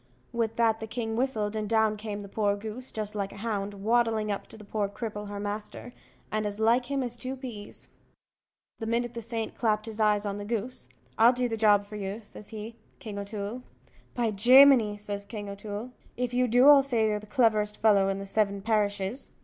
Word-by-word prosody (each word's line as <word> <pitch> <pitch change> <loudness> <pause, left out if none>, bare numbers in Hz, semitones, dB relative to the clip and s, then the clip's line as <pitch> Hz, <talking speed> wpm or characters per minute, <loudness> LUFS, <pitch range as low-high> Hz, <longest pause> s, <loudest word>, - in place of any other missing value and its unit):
With 225 -1 -1
that 225 -1 +2
the 220 - -6
king 225 -1 -3
whistled, 220 -4 -1
and 215 -1 -2
down 220 -1 +3
came 210 -1 -5
the - - -8
poor 205 0 0
goose, 220 +5 -7
just 215 -1 -4
like 200 -2 -3
a - - -11
hound, 205 -2 -3
waddling 220 0 +1
up 200 - -4
to - - -12
the 215 - -12
poor 205 -1 -1
cripple, 210 0 -5
her 205 0 -5
master, 210 +4 -5 0.4
and 215 -1 0
as 205 +1 -5
like 235 +3 +3
him 275 -1 -1
as 240 -1 -4
two 255 +2 -5
peas. 240 -6 -8 0.9
The 225 - -4
minute 235 +1 0
the 235 - -5
saint 225 0 -4
clapt 215 -2 0
his 225 -1 -7
eyes 210 -1 +3
on 200 0 -3
the - - -5
goose, 220 - -3 0.3
"I'll 235 +3 +7
do 250 0 0
the 225 - -2
job 210 -2 +4
for 210 +1 -8
you," 200 +2 -4
says 210 0 -11
he, 220 +1 -8 0.2
"King 205 -3 -7
O'Toole." 205 +3 -5 0.5
"By 235 -3 +1
Jaminee!" 240 0 +6
says 205 -1 -5
King 205 0 -7
O'Toole, 205 +4 -6 0.3
"if 250 0 -2
you 250 0 +2
do, 245 +3 +5
I'll 290 -1 +9
say 240 -5 +1
you're 210 -1 +1
the 210 - -13
cleverest 210 -2 +2
fellow 200 -3 +4
in 195 - -1
the 195 - -6
seven 200 -1 0
parishes." 205 +1 -1
215 Hz, 210 wpm, -28 LUFS, 205-235 Hz, 0.9 s, I'll